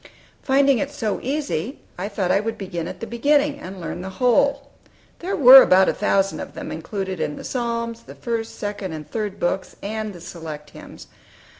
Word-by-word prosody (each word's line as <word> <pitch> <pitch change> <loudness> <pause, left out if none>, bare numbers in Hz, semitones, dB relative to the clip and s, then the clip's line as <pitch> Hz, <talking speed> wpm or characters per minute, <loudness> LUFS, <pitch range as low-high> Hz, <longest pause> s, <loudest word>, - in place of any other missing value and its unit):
Finding 275 -1 +3
it 285 - -1
so 230 -8 -2
easy, 275 - -2 0.2
I 190 +3 -4
thought 195 -3 -1
I 195 - +4
would 225 +2 -3
begin 175 -4 -4
at - - -8
the - - -3
beginning, 285 +5 +1
and 190 -7 -8
learn 175 +1 -5
the 190 - -5
whole. 275 +3 +2 0.5
There 375 +3 -2
were 265 -1 +10
about 190 -3 +5
a - - +1
thousand 195 -1 +1
of - - -8
them - - -6
included 190 +3 -4
in 150 - -2
the - - -9
Psalms, 235 -2 -3
the - - -13
First, 230 -2 -4
Second, 205 -4 -4
and 155 -1 -7
Third 210 -3 -4
Books, 185 +2 -2
and 215 +1 -3
the 180 - -11
Select 160 -4 -8
Hymns. - - -12
215 Hz, 190 wpm, -22 LUFS, 185-260 Hz, 0.5 s, were